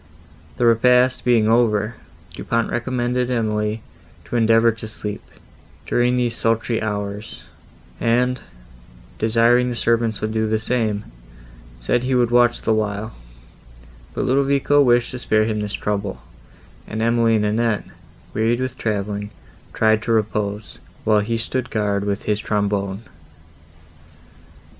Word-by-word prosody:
The 120 - +1
repast 125 +2 +4
being 115 -3 +3
over, 110 -1 +2 0.4
Du - - -8
Pont 115 0 0
recommended 125 +1 -1
Emily 110 -2 -1 0.4
to - - -6
endeavour 115 0 +4
to 110 0 -8
sleep, 105 -1 -6 0.6
during 125 +1 +1
these 120 -1 0
sultry 115 0 0
hours, 105 0 -4 0.6
and, 125 +2 +1 0.8
desiring 120 +2 +3
the 120 - -3
servants 115 -2 +1
would 110 - -2
do 110 0 0
the 110 0 +1
same, 110 -2 0 0.7
said - - 0
he 130 +1 0
would 120 -1 +2
watch 120 0 +3
the 110 - +2
while; 110 0 -2 1.0
but - - -1
Ludovico 140 +2 +3
wished 120 -2 +3
to 130 - -6
spare 110 -2 +2
him 110 -1 -1
this 105 0 -4
trouble; 100 -1 -3 0.7
and 110 - -5
Emily 115 -1 +3
and 105 -1 +1
Annette, 110 0 0 0.5
wearied 115 +2 +1
with 130 0 -4
travelling, 105 -1 -2 0.4
tried 110 0 +2
to 115 - -2
repose, 105 -1 -2 0.2
while 110 -1 +3
he 115 +3 -1
stood 125 +2 -3
guard 100 -3 -1
with 100 0 -2
his 105 -1 0
trombone. 100 -1 -1
115 Hz, 135 wpm, -21 LUFS, 105-120 Hz, 1.0 s, repast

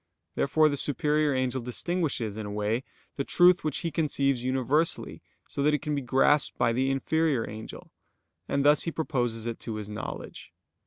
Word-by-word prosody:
Therefore 155 +3 +3
the 145 -1 -1
superior 150 +2 +1
angel 130 0 -1
distinguishes, 125 - -1
in 110 -1 -5
a - - -6
way, 105 +4 -1 0.3
the 140 - 0
truth 180 +5 +5
which 155 -3 -2
he 170 -2 -2
conceives 140 -4 0
universally, 135 +5 0 0.3
so - - -4
that 150 +1 +3
it 150 - -4
can 150 -1 -2
be 140 - -1
grasped 135 +3 +3
by 115 - +2
the 130 +3 +1
inferior 140 -1 0
angel; 110 +1 -9 0.6
and 140 0 0
thus 150 0 +5
he 165 - -2
proposes 120 -8 -2
it 115 -1 -4
to 115 - -5
his 105 -1 -6
knowledge. 105 - -7
135 Hz, 175 wpm, -27 LUFS, 120-150 Hz, 0.6 s, truth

